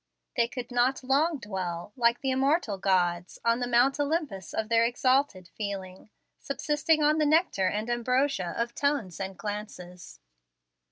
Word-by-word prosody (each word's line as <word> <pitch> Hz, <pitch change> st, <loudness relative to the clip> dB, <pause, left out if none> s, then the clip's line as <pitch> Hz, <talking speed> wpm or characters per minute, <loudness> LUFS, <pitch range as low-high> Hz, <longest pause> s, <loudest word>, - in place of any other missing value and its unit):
They 235 Hz, -, +2 dB
could 250 Hz, -1 st, -7 dB
not 250 Hz, +2 st, +1 dB
long 290 Hz, +5 st, +2 dB
dwell, 190 Hz, -5 st, -5 dB
like 235 Hz, -1 st, +2 dB
the 270 Hz, -, 0 dB
immortal 265 Hz, -, +1 dB
gods, 180 Hz, -2 st, 0 dB
on 230 Hz, +1 st, +3 dB
the 245 Hz, -, -1 dB
Mount 250 Hz, +4 st, +3 dB
Olympus 290 Hz, -, -2 dB
of 220 Hz, -, -2 dB
their 230 Hz, 0 st, +3 dB
exalted 245 Hz, -5 st, +1 dB
feeling, 195 Hz, -1 st, -6 dB, 0.3 s
subsisting 300 Hz, +2 st, 0 dB
on 305 Hz, +1 st, +3 dB
the 305 Hz, -, +3 dB
nectar 305 Hz, -, +2 dB
and 210 Hz, +4 st, -2 dB
ambrosia 240 Hz, -4 st, 0 dB
of 235 Hz, 0 st, -2 dB
tones 270 Hz, -, -1 dB
and 190 Hz, -1 st, -5 dB
glances. 205 Hz, -4 st, -7 dB
235 Hz, 150 wpm, -28 LUFS, 195-275 Hz, 0.3 s, on